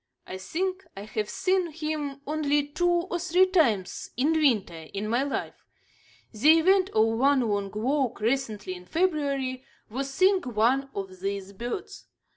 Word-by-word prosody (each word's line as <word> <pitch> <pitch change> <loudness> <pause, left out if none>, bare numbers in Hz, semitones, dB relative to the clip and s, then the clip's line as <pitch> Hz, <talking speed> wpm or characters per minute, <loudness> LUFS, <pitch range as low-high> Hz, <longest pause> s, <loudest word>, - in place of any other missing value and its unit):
I 185 - -7
think 370 - -3
I 200 - -6
have 215 0 -3
seen 370 -2 0
him 300 -3 -4
only 295 -1 0
two 350 +4 +1
or 350 0 0
three 360 +2 +4
times 255 - +1
in 280 +5 +2
winter 210 - +1
in 205 +2 -2
my 235 +4 +1
life. 280 0 -4 0.6
The 300 +9 +5
event 375 +3 +4
of 220 0 +3
one 275 0 +4
long 205 -4 -1
walk, 260 +3 0
recently, 220 -5 -1
in 180 0 -11
February, 280 - 0 0.3
was 270 +3 -3
seeing 375 +6 +3
one 250 +3 +1
of 190 -2 -6
these 195 0 -4
birds. 240 - -6
275 Hz, 150 wpm, -27 LUFS, 215-320 Hz, 0.6 s, The